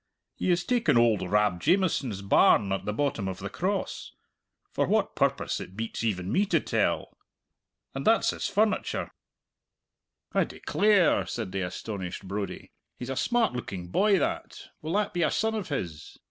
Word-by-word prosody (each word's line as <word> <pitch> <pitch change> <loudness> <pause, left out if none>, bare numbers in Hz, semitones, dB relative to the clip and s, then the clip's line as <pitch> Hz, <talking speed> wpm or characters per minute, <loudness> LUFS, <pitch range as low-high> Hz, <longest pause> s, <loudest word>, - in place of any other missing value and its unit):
He - - -2
has 175 0 +2
taken 240 - +2
oald 115 -3 +4
Rab 100 0 +1
Jamieson's 150 - +1
barn 100 0 +4
at 95 - -2
the 105 - -1
bottom 115 -4 -1
of 95 -1 -4
the - - -6
Cross - - -3 0.6
for - - 0
what - - +1
purpose - - 0
it 95 - -9
beats 115 0 -4
even 95 -4 -1
me 200 +2 +2
to 170 -4 +3
tell! - - -1 0.8
And 135 - -4
that's 225 +7 +4
his - - -3
furniture 210 +2 0 0.6
" - - -47
"I - - +3
declare!" 205 -5 +2
said 110 -6 -4
the 95 0 -2
astonished 95 0 -5
Brodie. 100 +1 -5 0.3
"He's 125 +1 -5
a - - -2
smart 235 - +1
looking 95 -7 -5
boy 200 - +3
that. 155 - -3
Will 155 +2 -4
that 210 +1 0
be 175 - -1
a 155 - +3
son 220 +1 0
of 210 -5 -4
his?" 85 - -5
120 Hz, 170 wpm, -27 LUFS, -, 0.8 s, oald